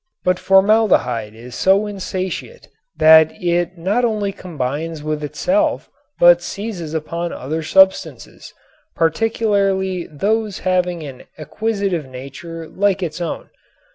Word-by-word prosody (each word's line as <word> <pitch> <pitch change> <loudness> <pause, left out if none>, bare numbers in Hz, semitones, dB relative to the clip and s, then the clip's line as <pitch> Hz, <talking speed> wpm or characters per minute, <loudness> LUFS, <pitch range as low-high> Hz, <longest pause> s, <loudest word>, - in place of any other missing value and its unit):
But 180 0 +1
formaldehyde 190 - +3
is 120 +2 -11
so 195 - +3
insatiate 190 - -5 0.3
that 160 0 +7
it 175 0 -1
not 200 +9 0
only 210 -4 0
combines 155 -2 -5
with 155 0 -3
itself 295 - 0 0.3
but 175 0 +7
seizes 180 -5 -5
upon 170 +2 -3
other 155 +5 -4
substances, 190 +4 +1 0.4
particularly 190 0 0
those 210 +6 -1
having 180 -2 0
an 135 -4 -10
acquisitive 195 -2 -2
nature 140 +6 -9
like 195 +1 0
its 165 0 -4
own. 170 - -5
180 Hz, 110 wpm, -19 LUFS, 155-200 Hz, 0.4 s, that